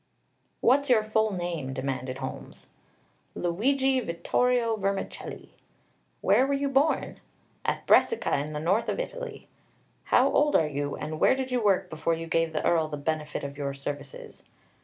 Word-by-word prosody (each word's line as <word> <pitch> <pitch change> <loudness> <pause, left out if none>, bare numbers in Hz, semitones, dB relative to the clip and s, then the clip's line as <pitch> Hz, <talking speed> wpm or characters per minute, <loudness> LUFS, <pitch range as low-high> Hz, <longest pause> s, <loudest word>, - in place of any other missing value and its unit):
"What's 280 +3 +3
your 225 -4 +5
full 220 0 +1
name?" 175 -7 -3
demanded 130 -1 -3
Holmes. - - -8 0.7
"Luigi 260 +10 +1
Vittorio 230 +5 +1
Vermicelli." 195 -1 -4 0.7
"Where 265 - +4
were 280 - +1
you 280 0 -1
born?" 275 +4 +1 0.4
"At - - -2
Brescia, 460 - +3
in 150 +2 -4
the 150 - -3
north 195 +9 +1
of - - -2
Italy." - - -6 0.6
"How - - +4
old 295 0 +2
are 160 - +5
you, 145 -1 -3
and 155 0 -5
where - - +5
did 260 -1 -4
you 250 -2 0
work 200 -3 +3
before 160 +1 0
you 165 0 -6
gave 165 0 +1
the 155 - -2
Earl 160 -2 +3
the 150 -1 -5
benefit 150 +1 -3
of 140 +1 -6
your 140 -1 -3
services?" 140 0 -7
175 Hz, 160 wpm, -27 LUFS, 150-250 Hz, 0.7 s, your